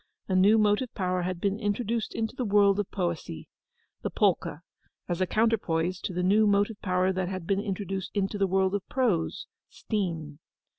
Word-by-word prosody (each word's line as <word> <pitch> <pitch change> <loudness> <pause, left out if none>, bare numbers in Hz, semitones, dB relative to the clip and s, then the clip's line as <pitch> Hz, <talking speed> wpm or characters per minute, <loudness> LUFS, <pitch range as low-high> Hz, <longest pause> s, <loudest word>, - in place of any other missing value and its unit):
A 190 - 0
new 200 +4 +6
motive 215 +3 +2
power 185 -1 0
had 180 0 -3
been 200 +3 -1
introduced 225 +1 -2
into 225 +1 -2
the 255 - -2
world 200 -2 +4
of 205 - -2
poesy—the 170 - -6
polka, - - +1 0.5
as 175 +1 -2
a 185 - +2
counterpoise 185 -6 +1
to - - -4
the 180 0 -2
new 210 +4 +4
motive 205 +1 +1
power 185 0 +1
that 185 -1 -2
had 185 -3 -5
been 195 +2 +1
introduced 195 -2 -4
into 200 +1 -1
the 195 - +3
world 190 0 +1
of 205 - 0
prose—steam. 170 - -2
195 Hz, 165 wpm, -28 LUFS, 180-210 Hz, 0.5 s, new